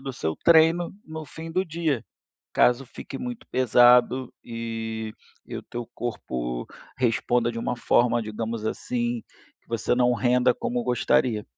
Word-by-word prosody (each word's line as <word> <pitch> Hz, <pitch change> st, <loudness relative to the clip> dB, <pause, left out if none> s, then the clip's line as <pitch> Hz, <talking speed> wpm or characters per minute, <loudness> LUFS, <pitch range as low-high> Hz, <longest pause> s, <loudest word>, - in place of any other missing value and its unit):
do 135 Hz, -1 st, -5 dB
seu 80 Hz, -9 st, -2 dB
treino 165 Hz, +1 st, +5 dB
no 160 Hz, 0 st, -6 dB
fim 160 Hz, +3 st, -8 dB
do 185 Hz, +2 st, +1 dB
dia, 160 Hz, -, -1 dB, 0.5 s
caso 125 Hz, +2 st, +3 dB
fique 125 Hz, -, -8 dB
muito 245 Hz, 0 st, -6 dB
pesado 125 Hz, 0 st, +5 dB
e 115 Hz, -1 st, -4 dB, 0.3 s
e -, -, -7 dB
o -, -, -8 dB
teu 120 Hz, -1 st, -6 dB
corpo 60 Hz, -, -4 dB, 0.3 s
responda 120 Hz, -1 st, +1 dB
de 115 Hz, -, -7 dB
uma 125 Hz, -, -2 dB
forma, 120 Hz, 0 st, +2 dB
digamos 110 Hz, +1 st, -4 dB
assim, 120 Hz, 0 st, -2 dB, 0.4 s
que -, -, -38 dB
você 115 Hz, +1 st, 0 dB
não 125 Hz, 0 st, +3 dB
renda 125 Hz, 0 st, +3 dB
como 120 Hz, 0 st, -2 dB
gostaria. 120 Hz, -2 st, +1 dB
120 Hz, 145 wpm, -25 LUFS, 115-130 Hz, 0.5 s, treino